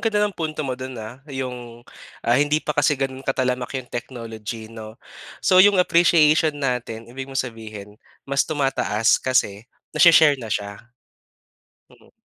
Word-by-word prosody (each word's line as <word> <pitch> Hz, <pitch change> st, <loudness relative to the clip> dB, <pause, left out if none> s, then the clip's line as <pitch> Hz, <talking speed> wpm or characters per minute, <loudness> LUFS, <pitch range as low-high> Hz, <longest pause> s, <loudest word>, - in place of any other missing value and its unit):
ganda 210 Hz, -2 st, +1 dB
ng 205 Hz, -, -2 dB
punto 155 Hz, -3 st, -4 dB
mo 130 Hz, -, -2 dB
do'n, 130 Hz, 0 st, -7 dB
ah, 110 Hz, +4 st, -9 dB
'yong, 125 Hz, -3 st, -7 dB, 0.4 s
ah, 120 Hz, -, +2 dB
hindi 145 Hz, +4 st, +2 dB
pa 150 Hz, -, -1 dB
kasi 145 Hz, 0 st, +2 dB
gano'n 135 Hz, -1 st, -3 dB
katalamak 130 Hz, -1 st, -2 dB
'yong 130 Hz, -2 st, -8 dB
technology 115 Hz, -2 st, -7 dB
'no, 110 Hz, 0 st, -10 dB, 0.5 s
so 185 Hz, -1 st, +6 dB
'yong 205 Hz, 0 st, +6 dB
appreciation 160 Hz, -4 st, +4 dB
natin 125 Hz, -5 st, -3 dB
ibig 135 Hz, +1 st, -7 dB
mong 135 Hz, -, -6 dB
sabihin 110 Hz, -3 st, -10 dB, 0.2 s
mas 140 Hz, +2 st, 0 dB
tumataas 135 Hz, -7 st, +1 dB
kasi 115 Hz, -4 st, 0 dB, 0.2 s
nashi-share 155 Hz, -3 st, +6 dB
na 115 Hz, -, -7 dB
siya, 100 Hz, -1 st, -4 dB, 1.1 s
mm. -, -, -22 dB
130 Hz, 145 wpm, -22 LUFS, 115-150 Hz, 1.1 s, so